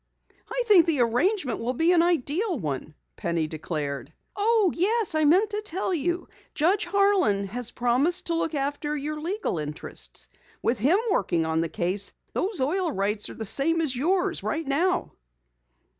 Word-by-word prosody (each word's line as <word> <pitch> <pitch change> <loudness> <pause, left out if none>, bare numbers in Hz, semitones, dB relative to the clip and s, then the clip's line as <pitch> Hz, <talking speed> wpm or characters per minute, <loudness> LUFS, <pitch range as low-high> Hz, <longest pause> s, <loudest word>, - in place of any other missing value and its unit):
"I - - -1
think 390 -7 +6
the 300 -6 +2
arrangement 250 - +1
will 245 +3 -2
be 325 +6 +3
an 345 -2 +5
ideal 345 - 0
one," 150 - -4 0.2
Penny 170 -2 -1
declared. 150 -3 -4 0.2
"Oh, 420 -2 +3
yes, 425 +4 +1
I 310 -1 +2
meant 375 +9 +4
to 420 0 -2
tell 380 -2 -2
you. 345 +2 -1 0.3
Judge 370 +7 +2
Harlan 370 - +2
has 235 +4 -2
promised 265 +11 +1
to 340 - -1
look 330 -1 -1
after 290 +2 -2
your 300 +2 -4
legal 355 - -2
interests. 150 0 -6 0.4
With 235 +1 +1
him 285 - +4
working 170 - +1
on 160 0 0
the 165 - -2
case 190 +2 -1 0.2
those 390 -1 -1
oil 335 +5 0
rights 205 -1 -1
are - - -9
the 220 - -5
same 315 +10 +1
as 300 -6 0
yours 355 +8 0
right 320 0 -2
now!" 345 +7 0
305 Hz, 165 wpm, -26 LUFS, 220-365 Hz, 0.4 s, think